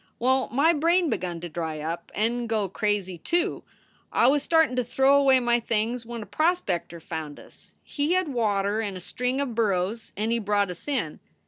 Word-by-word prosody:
Well, 260 +2 +1
my 295 +7 +4
brain 335 +2 +2
begun 175 -2 -3
to 175 - -5
dry 160 -1 -4
up 165 +3 -5
and 235 +2 0
go 215 -3 +1
crazy, 195 -2 -2
too. 345 - 0 0.5
I - - +3
was 280 +3 +4
startin 320 -3 +3
to 250 - +2
throw 265 +4 +3
away 270 -2 +5
my 240 -1 +2
things 230 +1 -2
when 235 -2 -5
a - - -12
prospector 205 - -1
found 160 -2 -6
us. - - -14
He 290 +3 -1
had 370 -3 +1
water 205 -3 +1
and 200 -4 -4
a - - -7
string 250 +8 -2
of 275 -4 -2
burros, 215 0 -1
and 215 +2 0
he 235 - +2
brought 205 -2 +1
us 180 - -8
in. 250 - -2
230 Hz, 195 wpm, -26 LUFS, 190-270 Hz, 0.5 s, away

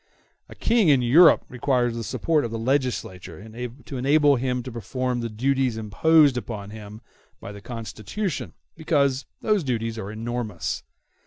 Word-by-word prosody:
A - - -11
King 225 -7 +2
in 135 -4 +4
Europe 155 +9 +6
requires 125 -2 0
the 115 - -4
support 155 +7 0
of 120 - -3
the 115 - -4
legislature 110 - -2 0.4
to 135 - -6
enable 145 +2 +4
him 125 0 -2
to 130 - -7
perform 125 +3 -3
the 115 -1 -3
duties 130 +1 0
imposed 140 +6 +4
upon 105 -4 -6
him 105 0 -10 0.4
by - - -8
the 100 0 -10
Constitution, 120 - -5 0.2
because 140 -4 +1 0.2
those 210 -5 +2
duties 115 -4 -2
are 100 -1 -6
enormous. 110 -4 -4
125 Hz, 150 wpm, -24 LUFS, 110-140 Hz, 0.4 s, Europe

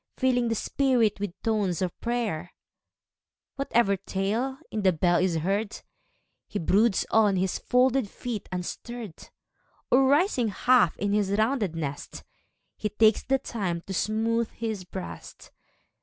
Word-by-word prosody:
Filling 250 -2 +2
the 225 - 0
spirit 240 -4 +1
with 200 -3 -5
tones 205 -6 0
of 185 -2 -3
prayer 220 -8 -2 1.0
Whatever 235 -7 +2
tale 210 +8 -2
in 215 - -2
the 190 -2 +4
bell 175 +1 +2
is 185 -2 +1
heard, 200 +6 -1 0.7
lie - - -2
broods 200 +5 +2
on 210 -3 +4
his 185 0 0
folded 250 -2 +2
feet 235 -3 -6
unstirr'd, 200 +2 -6 0.6
Oi, - - +7
rising 270 - +3
half 245 +5 +3
in 200 0 -1
his 205 -2 +1
rounded 215 - +1
nest. 145 -3 -5 0.5
He 210 - -3
takes 215 +1 +4
the 270 0 +1
time 195 -10 -3
to 195 - -7
smooth 225 +3 0
his 220 -5 -5
breast. 185 0 -9
215 Hz, 135 wpm, -27 LUFS, 190-240 Hz, 1.0 s, Oi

